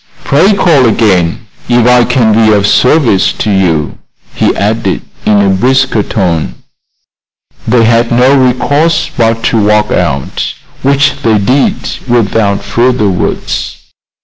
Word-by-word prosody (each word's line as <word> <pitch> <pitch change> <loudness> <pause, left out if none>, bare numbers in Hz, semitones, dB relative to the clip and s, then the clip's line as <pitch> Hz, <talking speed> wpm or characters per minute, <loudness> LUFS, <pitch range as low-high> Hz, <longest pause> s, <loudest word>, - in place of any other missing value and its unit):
Pray 185 +9 +2
call 160 -10 +2
again 100 -3 0 0.2
if 120 -1 +2
I 125 0 +4
can 110 -2 +1
be 110 0 +3
of 100 -1 +1
service 125 -3 +2
to 110 - -3
you," 85 -6 -1 0.3
he - - 0
added, 110 +3 -2 0.2
in 105 - +3
a 100 -1 +2
brisker 130 +3 +1
tone. 90 -7 -2 1.1
They 115 0 +2
had 115 +1 +1
no 125 +3 +3
recourse 145 +5 0
but 115 -1 0
to 115 - +1
walk 105 0 +1
out, 70 -6 -2 0.3
which 140 +1 +1
they 110 -2 +1
did 125 +7 +1 0.3
without 110 -4 0
further 120 -3 0
words. 90 - -3
115 Hz, 130 wpm, -9 LUFS, 100-130 Hz, 1.1 s, I